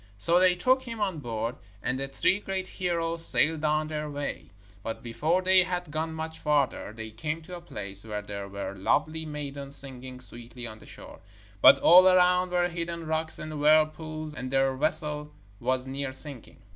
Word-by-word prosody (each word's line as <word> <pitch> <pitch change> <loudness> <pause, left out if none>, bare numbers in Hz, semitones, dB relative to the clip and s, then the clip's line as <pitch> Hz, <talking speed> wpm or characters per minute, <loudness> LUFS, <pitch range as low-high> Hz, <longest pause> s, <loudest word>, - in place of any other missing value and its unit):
So 170 - +6
they 185 -1 +4
took 255 +9 +2
him 230 -3 -8
on 190 -6 -2
board, 115 -1 -4 0.3
and 130 +1 -2
the 135 - -3
three 190 +8 0
great 190 -2 -4
heroes 170 -3 +3
sailed 160 -1 +6
on 155 0 0
their 150 -1 -5
way. 145 0 -6 0.3
But 115 +2 -7
before 155 +10 -1
they 185 0 +5
had 180 -3 -4
gone 160 +1 -3
much 160 0 -6
farther, 145 -7 -1
they 110 0 -9
came 150 +9 -5
to 180 +2 -9
a 175 - -10
place 100 - -8
where 105 -2 -6
there 100 -1 -7
were 100 0 -6
lovely 155 +11 -1
maidens 140 -2 -6
singing 130 -2 -8
sweetly 120 0 -11
on 110 -1 -9
the - - -16
shore, - - -13 0.4
but 140 - +8
all 180 +5 +7
around 180 0 +3
were 175 0 +1
hidden 170 -1 -6
rocks 160 0 -1
and 155 -1 -7
whirlpools, 155 0 +1
and 130 -3 -6
their 135 0 +1
vessel 150 0 0 0.2
was 130 +1 -1
near 135 0 -4
sinking. 130 -2 0
150 Hz, 185 wpm, -27 LUFS, 130-170 Hz, 0.4 s, but